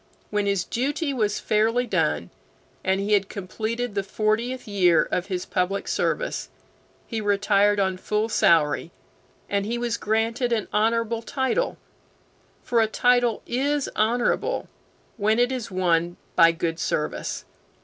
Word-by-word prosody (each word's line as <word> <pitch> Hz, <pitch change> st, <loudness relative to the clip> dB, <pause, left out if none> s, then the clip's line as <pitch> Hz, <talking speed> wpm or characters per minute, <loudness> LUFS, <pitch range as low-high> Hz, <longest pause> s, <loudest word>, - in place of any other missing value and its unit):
When 205 Hz, -1 st, 0 dB
his 200 Hz, -3 st, +1 dB
duty 280 Hz, -, -1 dB
was 215 Hz, -5 st, 0 dB
fairly 225 Hz, +3 st, +1 dB
done, -, -, 0 dB, 0.5 s
and 190 Hz, 0 st, +1 dB
he 205 Hz, +2 st, 0 dB
had 200 Hz, -1 st, +2 dB
completed 220 Hz, +4 st, -4 dB
the 200 Hz, -, 0 dB
fortieth 215 Hz, +6 st, -1 dB
year 180 Hz, -5 st, +4 dB
of 180 Hz, -, -1 dB
his 185 Hz, -2 st, -3 dB
public 190 Hz, +1 st, -1 dB
service, -, -, -1 dB, 0.6 s
he 225 Hz, -2 st, -4 dB
retired 205 Hz, 0 st, +3 dB
on 190 Hz, -1 st, +1 dB
his -, -, -21 dB
full 210 Hz, +1 st, 0 dB
salary, 165 Hz, -7 st, +3 dB, 0.6 s
and 200 Hz, 0 st, 0 dB
he 230 Hz, +4 st, -2 dB
was 235 Hz, -1 st, -1 dB
granted 230 Hz, +3 st, 0 dB
an 220 Hz, -3 st, 0 dB
honorable 230 Hz, +1 st, +1 dB
title; 265 Hz, -, -1 dB, 0.9 s
for 235 Hz, -1 st, +2 dB
a 220 Hz, -, +3 dB
title 245 Hz, 0 st, +2 dB
is 280 Hz, +3 st, 0 dB
honorable 240 Hz, -, +1 dB, 0.5 s
when 215 Hz, +1 st, +2 dB
it 245 Hz, +1 st, +3 dB
is 255 Hz, -4 st, -4 dB
won 175 Hz, -2 st, +1 dB, 0.2 s
by 165 Hz, 0 st, +7 dB
good 165 Hz, 0 st, -3 dB
service. 150 Hz, -, -2 dB
215 Hz, 140 wpm, -24 LUFS, 195-240 Hz, 0.9 s, by